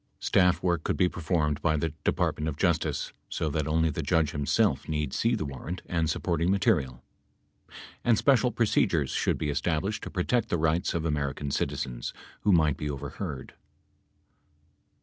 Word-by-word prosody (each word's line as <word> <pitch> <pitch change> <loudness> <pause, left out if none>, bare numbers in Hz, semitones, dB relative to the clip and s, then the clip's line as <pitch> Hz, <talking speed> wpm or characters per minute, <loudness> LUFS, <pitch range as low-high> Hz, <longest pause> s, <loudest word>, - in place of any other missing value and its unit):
Staff 90 -2 +2
work 85 -3 +1
could - - -1
be 90 - +4
performed 80 -4 -1
by 80 -1 +2
the 80 +2 0
Department 75 - 0
of 75 - -5
Justice, 80 -5 0 0.2
so 80 - -2
that 75 0 -1
only 80 +1 +2
the - - -3
judge 80 -3 +1
himself 70 -1 +1
need 75 -3 -1
see 115 +1 +2
the 100 - -3
106 70 -2 -6
warrant 90 +1 -5
and 80 -2 +1
supporting 85 +1 0
material. 95 - +1 1.0
And 120 -2 +4
special 130 -1 +3
procedures 100 - +1
should - - 0
be 75 -2 -1
established 85 +7 -1
to - - -6
protect 105 +5 0
the 85 - +1
rights 80 +2 +1
of 85 -1 -1
American 70 -2 -2
citizens - - -2 0.3
who 105 - +2
might 80 -5 +3
be 75 - -3
overheard. 70 +1 -6
80 Hz, 165 wpm, -28 LUFS, 75-90 Hz, 1.0 s, be